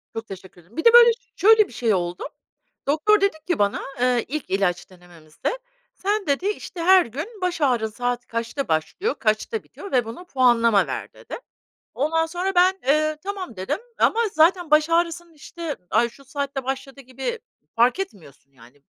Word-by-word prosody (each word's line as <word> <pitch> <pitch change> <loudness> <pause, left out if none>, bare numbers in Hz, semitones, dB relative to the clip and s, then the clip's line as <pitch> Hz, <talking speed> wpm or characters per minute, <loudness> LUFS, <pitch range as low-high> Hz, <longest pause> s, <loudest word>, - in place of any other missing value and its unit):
Çok 225 0 -5
teşekkür 190 -2 -11
ederim. 180 +8 -22
Bir 325 - -3
de 465 - +7
böyle 475 -1 +9
ş 465 - -15 0.2
şöyle 435 +1 +5
bir - - -15
şey 225 -1 +1
oldu. 175 -1 -2 0.6
Doktor 400 +8 +3
dedi 395 -5 +1
ki 350 -9 0
bana, 200 0 +1 0.2
eee, 250 -2 +2
ilk 295 +1 -5
ilaç 185 -2 -1
denememizde, 175 - -7 0.3
"sen" 410 -1 -2
dedi, 285 +8 0
işte, 390 -4 -4
"Her 375 -2 +6
gün 265 - -6
baş 355 -3 -2
ağrın 240 -6 +2
saat 245 +2 -3
kaçta 230 +4 -3
başlıyor, 165 - -1
kaçta 215 - -1
bitiyor 400 - -11
ve 245 -3 +2
buna 230 +11 -8
puanlama 240 - +3
ver." - - -5
dedi. - - -9 0.6
Ondan 325 +4 +1
sonra 360 +4 -3
ben, 370 +2 +4
eee, 310 +2 +2
"tamam" 385 - -5
dedim 185 - -2 0.2
ama 460 - +3
zaten 335 +1 +3
baş 305 +1 +4
ağrısının, 340 0 0
işte, 310 +1 -7
ay 235 - +3
şu 275 +4 -18
saatte 275 -1 -4
başladı 270 +1 -5
gibi 265 - -5 0.4
fark 245 +10 +3
etmiyorsun 155 - -9
yani. 135 +2 -20
275 Hz, 175 wpm, -23 LUFS, 225-355 Hz, 0.6 s, böyle